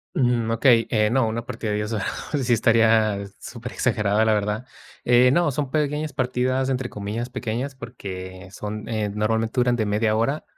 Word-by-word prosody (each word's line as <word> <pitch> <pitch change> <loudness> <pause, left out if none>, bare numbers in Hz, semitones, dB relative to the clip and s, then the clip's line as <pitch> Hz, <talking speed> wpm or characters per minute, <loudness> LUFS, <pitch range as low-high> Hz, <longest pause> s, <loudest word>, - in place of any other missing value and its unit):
Ujú, 120 -3 +1
okey, 115 0 +4
eh, 105 -2 +2
no, 130 +1 +2
una 115 +1 -3
partida 110 -2 -4
de 105 - 0
10 105 +2 -3
horas 100 -3 -2 0.4
sí 125 - 0
estaría 110 -3 +3 0.2
superexagerada, 110 -3 -1
la 110 - +3
verdad. 105 +3 -1 0.4
Eh, 125 +1 +5
no 170 +1 +3
son 140 0 -3
pequeñas 150 +1 -1
partidas, 130 0 0
entre 130 -1 -1
comillas 105 +4 -4
pequeñas, 125 +2 -4
porque 95 -6 -8
son, 105 +1 -6
eh, 110 -2 -1
normalmente 110 +2 -1
duran 120 0 +2
de 110 - 0
media 105 +1 +1
hora 135 +7 0
115 Hz, 170 wpm, -23 LUFS, 105-125 Hz, 0.4 s, Eh